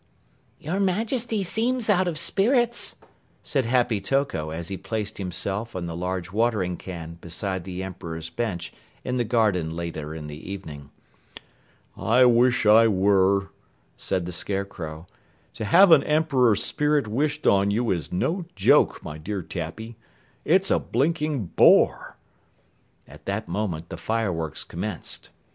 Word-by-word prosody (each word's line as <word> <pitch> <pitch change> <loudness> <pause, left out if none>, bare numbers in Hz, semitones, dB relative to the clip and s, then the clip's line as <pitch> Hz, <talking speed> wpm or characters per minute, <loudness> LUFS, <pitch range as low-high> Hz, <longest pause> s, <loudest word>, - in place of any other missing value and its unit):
"Your 175 +6 -3
Majesty 220 +3 0
seems 230 +5 -1
out 190 -3 +3
of 165 -3 -2
spirits," 240 - +1 0.5
said 135 -4 0
Happy 120 -4 +1
Toko 120 - -1
as 80 +1 -5
he 100 - -3
placed 105 +2 -4
himself 100 +4 -3
and 90 -2 -3
the 85 - -5
huge 90 0 -3
watering 105 -4 0
can 85 -2 -8
beside 95 +2 -4
the 95 0 -5
Emperor's 80 -3 -6
bench 90 -5 -3 0.3
in 125 0 -2
the 120 - +1
garden 105 -8 +1
later 80 -2 -5
in 80 -2 -7
the 75 +5 -8
evening. 75 -8 -8 1.1
"I 125 +3 +4
wish 120 0 +4
I 110 +2 +7
were," 100 -1 +3 0.5
said 90 -2 -2
the 90 - -5
Scarecrow. 90 -4 -4 0.5
"To 110 - -5
have 180 - +6
an 150 -4 +7
Emperor's 140 -8 +3
spirit 150 -4 +1
wished 145 +7 -1
on 100 0 +4
you 115 +3 0
is 85 -6 -3
no 170 - -1
joke, - - +3
my 75 0 -7
dear 95 +3 -4
Tappy. 105 +9 -6 0.5
It's 190 +3 +3
a - - +4
blinking 150 - -1
bore!" - - +4 0.9
At 75 +2 -15
that 100 +3 -3
moment, 85 -4 -3
the 85 - -6
fireworks 85 -5 -2
commenced. 90 +1 -6
105 Hz, 140 wpm, -25 LUFS, 85-135 Hz, 1.1 s, I